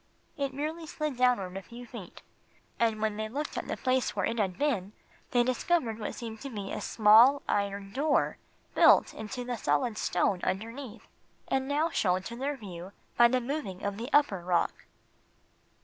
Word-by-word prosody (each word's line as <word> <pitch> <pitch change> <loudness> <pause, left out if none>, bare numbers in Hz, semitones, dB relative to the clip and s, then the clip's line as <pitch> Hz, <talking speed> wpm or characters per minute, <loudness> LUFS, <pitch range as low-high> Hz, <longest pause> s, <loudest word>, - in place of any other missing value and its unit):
It 280 -2 -2
merely 310 +4 -4
slid 305 -4 -3
downward 245 -8 +2
a 195 - -4
few 235 +4 -11
feet, 225 -7 -10 0.6
and 220 -2 +1
when 215 -1 0
they 215 0 -3
looked 290 +6 -4
at - - -4
the - - -3
place 255 -1 0
where - - 0
it 230 - -2
had 190 -4 0
been 215 -10 -1 0.4
they 245 -2 +3
discovered 255 -2 0
what 210 - -4
seemed 225 -2 -7
to 275 - -5
be 205 -5 -6
a - - -4
small 230 +6 +6
iron 200 -1 -1
door, 290 +4 +1 0.3
built - - +6
into 235 +4 -6
the 245 -1 -3
solid 180 +8 0
stone 180 +1 +1
underneath, 230 +5 -4 0.4
and 265 0 0
now 300 +4 +1
shown 185 -1 +1
to 235 - -6
their 275 +3 -2
view 190 -4 -9 0.2
by 240 - +7
the 255 +2 +1
moving 245 -7 -4
of 200 0 -2
the 235 +4 -5
upper 290 -10 +3
rock. 175 0 -1
235 Hz, 180 wpm, -29 LUFS, 200-270 Hz, 0.6 s, by